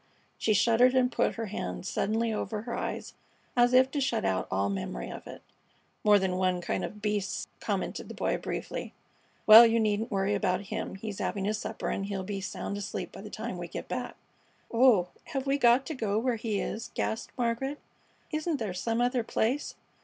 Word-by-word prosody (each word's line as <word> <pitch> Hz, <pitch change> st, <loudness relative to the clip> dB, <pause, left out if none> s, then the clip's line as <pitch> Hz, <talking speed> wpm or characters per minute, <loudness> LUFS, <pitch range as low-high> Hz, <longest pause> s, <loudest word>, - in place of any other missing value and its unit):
She 215 Hz, -, +2 dB
shuddered 235 Hz, +5 st, +4 dB
and 255 Hz, -1 st, +3 dB
put -, -, +1 dB
her 225 Hz, -, -3 dB
hands 90 Hz, -, -4 dB
suddenly 225 Hz, +2 st, 0 dB
over 215 Hz, 0 st, -3 dB
her 235 Hz, 0 st, -4 dB
eyes -, -, -4 dB, 0.4 s
as 245 Hz, 0 st, +5 dB
if 260 Hz, +1 st, +5 dB
to 285 Hz, -, -1 dB
shut 260 Hz, -, 0 dB
out 95 Hz, -1 st, 0 dB
all 100 Hz, +1 st, +1 dB
memory 95 Hz, -11 st, -4 dB
of -, -, -9 dB
it. -, -, -10 dB, 0.6 s
"More 210 Hz, -1 st, +7 dB
than 190 Hz, -2 st, 0 dB
one 185 Hz, -1 st, +1 dB
kind 175 Hz, -, -2 dB
of 210 Hz, 0 st, -6 dB
beasts!" 210 Hz, -2 st, -1 dB
commented -, -, -3 dB
the -, -, -8 dB
Boy, -, -, 0 dB
briefly. -, -, -5 dB, 0.5 s
"Well, 220 Hz, +2 st, +12 dB
you 230 Hz, 0 st, +4 dB
needn't 215 Hz, 0 st, +1 dB
worry 195 Hz, -1 st, +1 dB
about 185 Hz, -2 st, +1 dB
him; 220 Hz, -2 st, -3 dB
he's 200 Hz, 0 st, -6 dB
having 195 Hz, -1 st, -2 dB
his 210 Hz, +1 st, 0 dB
supper -, -, -4 dB
and 195 Hz, -, -2 dB
he'll 195 Hz, -2 st, -3 dB
be 195 Hz, 0 st, -4 dB
sound 200 Hz, +1 st, -4 dB
asleep 205 Hz, -, -4 dB
by -, -, -10 dB
the -, -, -8 dB
time -, -, -5 dB
we -, -, -5 dB
get -, -, -6 dB
back." -, -, -4 dB, 0.6 s
"Oh, 230 Hz, -7 st, +5 dB, 0.2 s
have 270 Hz, -1 st, -3 dB
we 275 Hz, +1 st, +1 dB
got 245 Hz, +1 st, +5 dB
to 320 Hz, -, -4 dB
go 215 Hz, -6 st, -1 dB
where 240 Hz, +2 st, +1 dB
he 215 Hz, -2 st, -1 dB
is?" 220 Hz, -, -4 dB
gasped 220 Hz, -, -2 dB
Margaret. 245 Hz, +4 st, -1 dB, 0.5 s
"Isn't 310 Hz, 0 st, -1 dB
there 215 Hz, -7 st, -3 dB
some 225 Hz, +6 st, -1 dB
other 245 Hz, 0 st, +1 dB
place? 240 Hz, +5 st, -1 dB
220 Hz, 200 wpm, -29 LUFS, 195-245 Hz, 0.6 s, Well